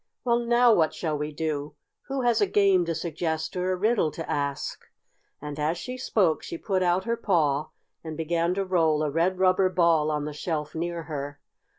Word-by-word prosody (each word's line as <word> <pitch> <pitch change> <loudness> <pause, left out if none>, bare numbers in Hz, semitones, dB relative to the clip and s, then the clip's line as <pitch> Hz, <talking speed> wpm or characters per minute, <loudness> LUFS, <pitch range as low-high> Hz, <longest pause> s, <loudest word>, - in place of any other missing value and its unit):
Well, 235 -1 +2
now 240 0 +4
what 160 -6 +2
shall 155 -3 -2
we 150 +1 -3
do? 150 -1 -3 0.3
Who 270 -1 -2
has 240 -3 +2
a 205 - +4
game 195 -2 +3
to 165 -1 -2
suggest 160 0 -3
or 180 +1 0
a - - +1
riddle 210 -3 +2
to 165 - -6
ask?" 140 -1 -2 0.6
and, 150 0 -7
as 155 +3 0
she 250 +8 -6
spoke, 200 -10 +1
she 170 - -6
put 190 +1 -1
out 180 +1 +2
her 230 +3 0
paw 155 -9 +1 0.3
and 160 -2 -6
began 170 +2 0
to 195 0 -1
roll 160 -5 +2
a 150 - -1
red 170 +5 +1
rubber 185 0 +3
ball 170 -4 +3
on 150 -1 -1
the 150 - -5
shelf 150 0 -3
near 170 +1 -3
her. 145 -2 -6
170 Hz, 200 wpm, -26 LUFS, 155-190 Hz, 0.6 s, now